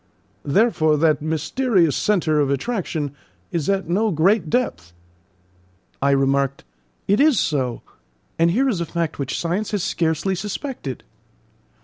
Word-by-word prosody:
Therefore 155 -2 +3
that 155 -1 +2
mysterious 165 - +1
centre 170 -7 +1
of 145 -2 +2
attraction 155 - -2 0.4
is 165 -2 -2
at 195 -3 0
no 205 +6 +1
great 175 +1 +2
depth." 90 - -1 1.1
I 140 - +3
remarked: 140 0 +1 0.4
"It 200 +2 +3
is 290 -5 +4
so; 130 -5 -1 0.6
and 165 +1 +4
here 250 +10 +2
is 205 -10 0
a - - -1
fact 165 -3 -3
which 135 -1 -2
science 180 +5 -2
has 205 -4 -1
scarcely 165 +3 0
suspected." 205 - -5
165 Hz, 130 wpm, -21 LUFS, 145-205 Hz, 1.1 s, is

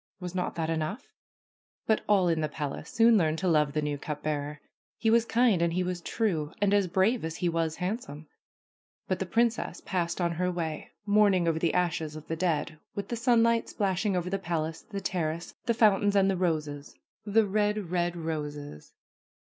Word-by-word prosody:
Was 180 -1 -6
not 180 -1 -2
that 165 -1 -1
enough? 165 - -3 0.7
But 220 - +2
all 195 -3 +4
in 165 -2 +1
the 155 - -1
palace 145 -2 -5
soon 230 -1 +5
learned 160 -2 +1
to 185 - -1
love 150 -4 +3
the 150 0 0
new 145 -1 -2
cup 150 0 -5
bearer. 150 -1 -2 0.4
He 225 - +2
was 230 0 +4
kind 230 -6 +3
and 170 -1 +1
he 180 +1 +1
was 180 -1 -3
true 170 -9 -1
and 205 0 +2
as 200 -2 +3
brave 190 +7 +2
as 160 0 -3
he 180 - -1
was 165 -1 0
handsome. 180 - -4 0.8
But 185 - -1
the 190 - -2
princess 230 +4 0
passed 175 -2 -2
on 170 -1 +1
her 180 +2 -1
way, 165 -3 -4 0.2
mourning 205 -4 +4
over 160 -1 +1
the 170 - +1
ashes 160 -4 0
of 155 -1 -9
the 165 - -2
dead, 160 -2 -1 0.2
with 200 - -4
the 235 - -1
sunlight 230 -1 +3
splashing 195 -1 0
over 180 +1 -2
the 195 - 0
palace, 165 -3 -3
the 200 -3 -6
terrace, 170 -2 -2
the 235 - +3
foun 215 -4 +5
tains 205 0 +2
and 195 -1 +4
the - - 0
roses, 155 -5 -2 0.3
the 215 +1 +3
red, 205 -2 0
red 175 -1 0
roses. 150 - -5
175 Hz, 195 wpm, -28 LUFS, 160-205 Hz, 0.8 s, soon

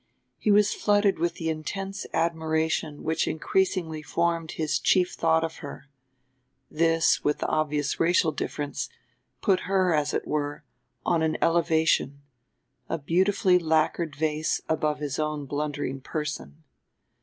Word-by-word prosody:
He - - 0
was 210 0 +5
flooded 205 -2 +2
with 170 +1 0
the 165 - -4
intense 195 +5 -4
admiration 160 -2 -1
which 160 +1 0
increasingly 165 -1 0
formed 165 +1 -1
his 155 -2 -1
chief 180 -2 +3
thought 160 0 +2
of 160 0 -4
her; 145 0 -9 0.8
this, 165 +1 +2
with 150 - +1
the - - -3
obvious 150 -2 0
racial 165 -1 +3
difference, 145 -1 -4 0.5
put 190 -4 +2
her, 185 -3 +3
as 150 -1 +1
it - - -1
were, 145 0 -2 0.4
on 170 -2 +2
an 160 0 +1
elevation 160 -4 +2 0.7
a 165 - -1
beautifully 180 +4 +3
lacquered 160 -1 +1
vase 155 +1 0
above 155 -1 0
his 145 -1 -4
own 150 -1 -2
blundering 145 -1 -3
person. 150 - -5
160 Hz, 130 wpm, -26 LUFS, 150-170 Hz, 0.8 s, was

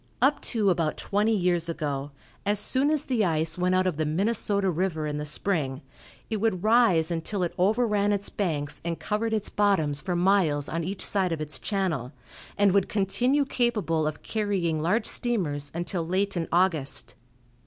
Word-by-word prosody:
Up 275 +4 +3
to 210 -5 +1
about 165 -3 0
twenty 210 +2 +1
years 175 -3 +1
ago, 145 -4 -3 0.3
as 205 +1 +2
soon 265 +6 +2
as 300 -1 0
the 245 -5 +1
ice 160 -2 0
went 180 +1 +2
out 185 0 +2
of 180 -5 -1
the 155 - +1
Minnesota 200 +3 +1
river 165 -2 -1
in 150 -1 -3
the 150 - -4
spring, 150 -4 -2 0.5
it 220 - -2
would 205 -4 0
rise 215 -8 +4
until 175 +4 -2
it 175 - -2
overran 210 +1 +2
its 200 -1 -1
banks 150 -7 -3
and 170 -1 -3
covered 220 +2 -1
its 215 -2 -1
bottoms 160 -9 +1
for 180 +5 -2
miles 175 -6 +2
on 165 +1 -3
each 190 +3 -3
side 190 -3 0
of 165 - -2
its 150 -3 -3
channel, 170 - -2 0.4
and 205 -1 +4
would 195 0 +2
continue 245 +8 +1
capable 210 - 0
of 155 - -5
carrying 190 -7 -1
large 210 +8 +1
steamers 155 -12 -1
until 175 0 -2
late 190 +4 -1
in 170 -2 -2
August. 170 -6 +1
185 Hz, 175 wpm, -26 LUFS, 160-210 Hz, 0.5 s, rise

